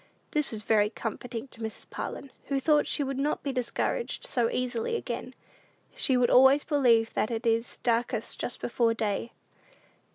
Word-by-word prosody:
This 300 -1 0
was 215 -2 -4
very 210 -1 +3
comforting 230 +2 -5
to 230 - -12
Mrs. 220 0 -6
Parlin, 275 - -6
who 275 -1 0
thought 300 +1 +3
she 290 - 0
would 270 0 -3
not 290 +2 0
be 280 - -1
discouraged 255 - -2
so 235 -2 +1
easily 250 - -1
again; - - -4 0.6
she 260 -3 +2
would 245 -1 +3
always 265 +3 +7
believe 240 -7 +3
that - - 0
it 230 0 -3
is 230 0 0
"darkest 235 -1 0
just - - -3
before 230 -1 +1
day." 220 +1 -2
245 Hz, 165 wpm, -28 LUFS, 230-275 Hz, 0.6 s, always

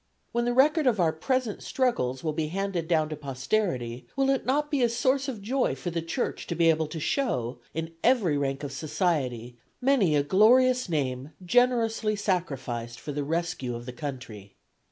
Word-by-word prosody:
When 235 0 0
the 245 - +1
record 300 +3 +4
of 225 -5 +2
our 165 -3 +3
present 250 +5 -1
struggles 130 - -1
will 155 -2 -1
be 155 0 -1
handed 185 -1 -2
down 155 -3 +2
to 155 - -4
posterity 135 - -2
will 270 0 +2
it 270 - -1
not 295 +3 +1
be 285 -3 +1
a 240 - +4
source 260 +4 +1
of 225 -7 -5
joy 255 +5 0
for 175 - -5
the 165 0 -2
Church 165 0 -3
to 170 - -3
be 165 -1 +5
able 160 -1 0
to 160 +2 -6
show, 130 - -1 0.2
in 160 0 -4
every 225 - +3
rank 135 0 -1
of 145 - -4
society, 140 - -2 0.2
many 250 - +3
a 145 - +3
glorious 250 - +4
name 135 -2 -2
generously 225 -1 +2
sacrificed 135 - -2
for 150 - -6
the 145 0 -2
rescue 155 -5 -2
of 120 0 -7
the 125 - -7
country? 120 -7 -7
165 Hz, 185 wpm, -27 LUFS, -, 0.2 s, be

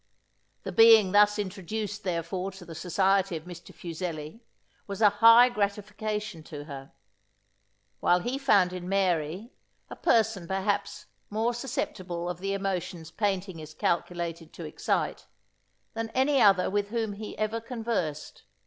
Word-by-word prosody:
The - - -4
being 225 -4 +7
thus 210 +1 +5
introduced 205 +2 -4
therefore 180 +1 -2
to 190 -2 -12
the 165 - -9
society 190 +1 +1
of 155 - -10
Mr. 175 0 -11
Fuseli, 165 +1 -6 0.5
was 200 -1 -5
a 210 -2 +6
high 230 +2 +9
gratification 210 -3 -3
to 145 -2 -8
her; 140 -2 -9 1.1
while 180 0 +3
he 250 +7 -3
found 200 -10 +3
in 180 0 -6
Mary, 185 - 0 0.4
a - - -6
person 220 -6 +1
perhaps 195 +2 -2 0.2
more 225 +3 0
susceptible 185 -8 -4
of 175 - -8
the 195 +1 -2
emotions 180 -4 -4
painting 195 -4 -2
is 155 0 -10
calculated 170 -1 -2
to 170 - -8
excite, 150 - -2 0.7
than 225 0 -3
any 270 +1 +3
other 195 -3 +5
with 205 0 0
whom 220 -1 -2
he 210 +1 -8
ever 215 +1 -1
conversed. 225 - -4
195 Hz, 140 wpm, -28 LUFS, 175-215 Hz, 1.1 s, high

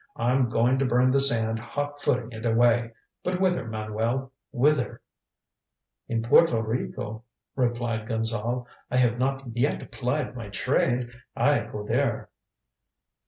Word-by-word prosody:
I'm 125 +1 +2
going 120 +3 +2
to 135 - +2
burn 125 +1 +3
the 135 +1 +4
sand 115 -4 +3
hot 145 +4 -4
footing 125 -5 0
it 110 -1 -8
away. 120 0 +3 0.3
But 180 0 -1
whither, 180 -10 +1
Manuel, 110 +4 -2 0.2
whither?" 140 0 +1 1.1
"In 115 -1 -1
Porto 120 +1 +5
Rico," 110 -1 -4 0.3
replied 120 -3 -1
Gonzale, 115 +1 -1 0.2
"I 125 - 0
have 120 -1 +3
not 135 -2 -2
yet 135 +5 -1
plied 130 +1 -2
my 115 -4 -7
trade. 120 +4 0 0.2
I - - +3
go 105 - -6
there." - - -1
120 Hz, 130 wpm, -26 LUFS, 115-130 Hz, 1.1 s, Porto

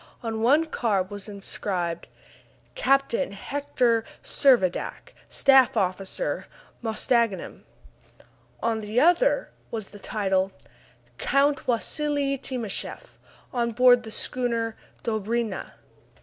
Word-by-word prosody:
On 225 -1 -3
one 275 +7 +5
of - - -2
the 315 - -21
cards 200 -5 0
was 205 +1 -6
inscribed: 185 -4 -3 0.7
Captain 275 - +1
Hector 245 0 0 0.2
Servadac, 240 -11 +2 0.2
Staff 265 -4 +5
Officer, 195 - -1 0.3
Mostaganem. 230 -2 0 1.0
On 225 -1 0
the 215 +3 0
other 355 - +3 0.2
was 220 -3 -5
the 205 - -12
title: 195 -2 0 0.7
_Count 280 +1 +2
Wassili 280 +3 +1
Timascheff, 245 -7 -5 0.3
On 235 -2 0
board 245 0 +6
the 225 - -9
Schooner 230 -1 -2 0.3
"Dobryna." 220 -1 -2
230 Hz, 100 wpm, -26 LUFS, 205-265 Hz, 1.0 s, board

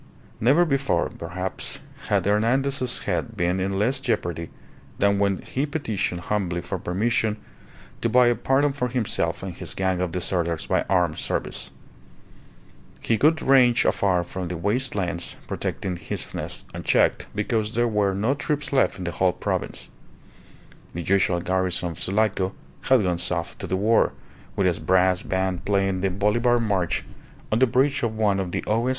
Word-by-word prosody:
Never 140 +10 +4
before, 140 -3 +1
perhaps, 95 +1 -4 0.3
had - - +1
Hernandez's 125 +5 +1
head 100 +4 -2
been 90 +1 +1
in 95 +1 -1
less 125 +7 +1
jeopardy 85 -10 -2 0.5
than 100 0 +2
when 100 -2 +1
he 140 +3 -2
petitioned 110 - -2
humbly 90 -4 -1
for 90 +2 -4
permission 110 +4 0 0.6
to - - +1
buy 125 0 +5
a 120 - +4
pardon 135 +4 +1
for 125 -3 -1
himself 120 -3 -1
and - - -5
his - - -6
gang 95 -1 0
of 90 -2 -1
deserters 85 -2 -1
by - - +1
armed 90 -4 +2
service. - - -3 1.3
He 115 - +1
could 160 +2 +3
range 125 -3 +5
afar 90 -3 +2
from 90 +1 -5
the 90 0 -4
waste 115 +9 0
lands 90 -3 -2
protecting 90 -2 -3
his 85 - -3
fastness, - - -4
unchecked, - - +1
because 105 +1 -1
there 120 +1 +2
were 105 -3 +1
no 110 +7 +1
troops 145 0 -3
left 135 - +3
in 95 - -6
the 85 - -2
whole 90 +1 +2
province. - - -3 1.1
The 85 - -3
usual 95 -1 +2
garrison 90 0 0
of 85 0 -8
Sulaco 95 -1 0 0.3
had 130 -5 +5
gone 90 -2 0
south 85 -1 -2
to - - -5
the 95 - 0
war, 110 +4 +3 0.4
with 100 - +1
its 90 -2 +1
brass 95 0 +3
band 95 -2 -1
playing 95 -2 +1
the 95 - +1
Bolivar 110 +6 +2
march 100 -7 0 0.5
on 110 - +2
the 130 - +5
bridge 135 +4 +2
of 110 -2 -2
one 105 -3 +2
of 90 -2 -3
the - - -2
O.S. 115 +4 +1
100 Hz, 165 wpm, -24 LUFS, 90-120 Hz, 1.3 s, buy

